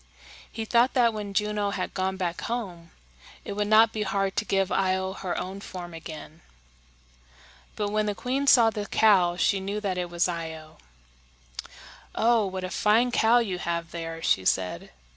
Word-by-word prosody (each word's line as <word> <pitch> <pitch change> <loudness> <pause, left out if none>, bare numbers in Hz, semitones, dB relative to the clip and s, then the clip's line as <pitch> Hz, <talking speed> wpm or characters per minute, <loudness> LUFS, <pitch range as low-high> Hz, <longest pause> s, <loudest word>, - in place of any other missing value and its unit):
He 225 0 -5
thought 235 +3 +2
that 235 -3 +4
when 205 -2 -6
Juno 210 -1 0
had 190 -2 -4
gone 190 0 -2
back 175 -2 -3
home, 190 -8 -5 0.6
it - - -4
would 205 0 -1
not 220 +1 +5
be 215 - -3
hard 195 -1 -1
to 210 - 0
give 195 -2 0
Io 190 0 0
her 190 -2 -4
own 190 +2 -6
form 175 -3 -8
again. 160 0 -10 1.3
But 210 -1 -2
when 215 0 0
the 205 - -1
queen 270 +5 -2
saw 235 -4 +6
the 210 -2 -5
cow, 190 -6 +4
she 195 +3 +1
knew 200 +2 -3
that 190 -3 -2
it 175 -1 -3
was 175 +1 +1
Io. 160 - -6 1.4
"Oh, 225 -2 +3
what 190 0 -5
a 185 - -4
fine 230 +4 +2
cow 230 0 +4
you 200 -7 -1
have 170 -1 -3
there!" 165 -1 -6
she 95 - +2
said. 90 -2 -1
195 Hz, 175 wpm, -26 LUFS, 175-215 Hz, 1.4 s, saw